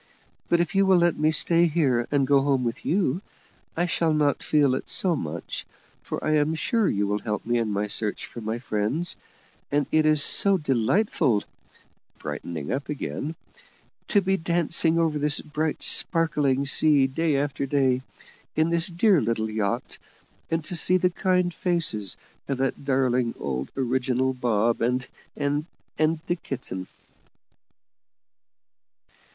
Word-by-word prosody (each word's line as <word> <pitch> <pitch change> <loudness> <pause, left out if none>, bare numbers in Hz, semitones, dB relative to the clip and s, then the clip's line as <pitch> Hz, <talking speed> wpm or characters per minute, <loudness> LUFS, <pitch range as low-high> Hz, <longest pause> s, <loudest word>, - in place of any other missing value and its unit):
But 170 - +3
if 175 0 -1
you 195 0 +3
will 190 -1 +5
let 175 -1 +2
me 155 +1 +1
stay 170 +2 +3
here 135 -7 +1
and 140 -2 +1
go 140 0 +3
home 135 -2 +1
with 120 -1 -4
you, 180 -3 0 0.6
I 175 - +1
shall 165 -2 0
not 145 -2 +1
feel 145 -4 +2
it 130 - -4
so 180 -3 +3
much, 80 - -5 0.4
for - - -6
I 155 0 +2
am 150 +2 +1
sure 225 +5 0
you 100 0 0
will 105 +1 -1
help 105 -2 -4
me 120 +1 +1
in 115 -2 -1
my 100 0 -1
search 105 0 -2
for 120 - -10
my 110 +1 -3
friends; 120 +8 -1 0.6
and 145 0 +1
it 155 0 +3
is 155 -2 +6
so 195 -1 +6
delightful," 135 - +1 0.7
brightening 75 0 -6
up 140 +2 -3
again 150 +1 -4 0.7
"to 205 - +3
be 190 0 0
dancing 165 -1 +1
over 160 -3 +1
this 145 0 +3
bright, 155 0 -3
sparkling 150 -5 +2
sea 145 -1 +4
day 145 +2 0
after 140 -1 -2
day, 130 -2 +1 0.5
in 160 +1 +1
this 170 +2 +3
dear 180 -1 +3
little 110 -1 -2
yacht, 105 -2 -2 0.5
and 165 -1 -2
to 175 - -4
see 180 +2 +5
the 180 0 +1
kind 180 0 0
faces 155 - 0 0.3
of 135 - -2
that 135 +1 -2
darling 130 -3 +1
old 65 -1 -4
original 130 0 0
Bob 120 -2 0
and 125 +2 0 0.3
and 145 +2 -1 0.3
and 155 0 +1
the 175 - -1
kitten." 120 - -6
145 Hz, 155 wpm, -25 LUFS, 120-165 Hz, 0.7 s, is